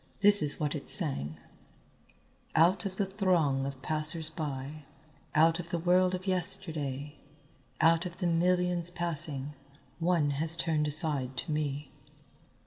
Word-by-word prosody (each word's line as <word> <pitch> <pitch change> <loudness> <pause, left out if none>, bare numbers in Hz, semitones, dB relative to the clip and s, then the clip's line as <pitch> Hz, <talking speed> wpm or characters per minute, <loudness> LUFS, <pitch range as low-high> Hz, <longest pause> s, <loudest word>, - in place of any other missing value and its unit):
This 205 0 +8
is 145 -1 -1
what 150 -2 -2
it 150 - -6
sang: 105 - +5 1.2
"Out 175 +4 +2
of 190 - -9
the 200 - -2
throng 175 -9 -1
of 135 -1 -9
passers 155 +1 0
by, 150 -1 -7 0.5
out 165 +2 +3
of 170 -1 -8
the 170 - -3
world 180 +2 +1
of 185 +1 -9
yesterday, 150 -6 -2 0.6
out 165 +2 +2
of 175 - -12
the 185 - -4
millions 175 0 0
passing, 155 -5 -4 0.5
one 165 -4 0
has 160 +4 +2
turned 160 -3 -1
aside 145 -4 +1
to 160 - -5
me." 145 -1 -4
160 Hz, 135 wpm, -28 LUFS, 145-175 Hz, 1.2 s, This